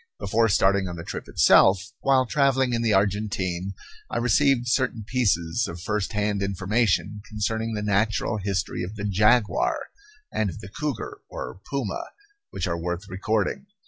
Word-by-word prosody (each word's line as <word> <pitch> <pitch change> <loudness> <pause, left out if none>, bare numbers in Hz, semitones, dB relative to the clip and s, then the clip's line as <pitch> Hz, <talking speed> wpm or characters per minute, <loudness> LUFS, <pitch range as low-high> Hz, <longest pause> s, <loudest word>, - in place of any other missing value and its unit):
Before 115 +3 +2
starting 95 -1 +3
on 90 - -5
the 85 - -7
trip - - -6
itself, 95 +1 +4
while 130 -1 +3
travelling 135 -1 +2
in 115 - 0
the 115 -2 +2
Argentine, 100 -2 0 0.4
I - - -2
received 125 +2 +3
certain 120 -2 0
pieces 90 -11 +1
of 85 - -7
first 105 +4 -2
hand 105 -1 0
information 100 0 0
concerning 110 +1 -2
the 105 - -3
natural 105 +1 +1
history 95 -2 -2
of 95 +4 -5
the 105 -1 -5
jaguar, 105 +3 +2 0.4
and 110 -2 0
of 80 - -8
the 90 - -9
cougar, 145 -1 -4
or 65 +10 -7
puma, 135 -8 -2 0.5
which - - -3
are 85 -2 -2
worth 90 +3 -3
recording. 105 - -1
105 Hz, 155 wpm, -25 LUFS, 95-115 Hz, 0.5 s, itself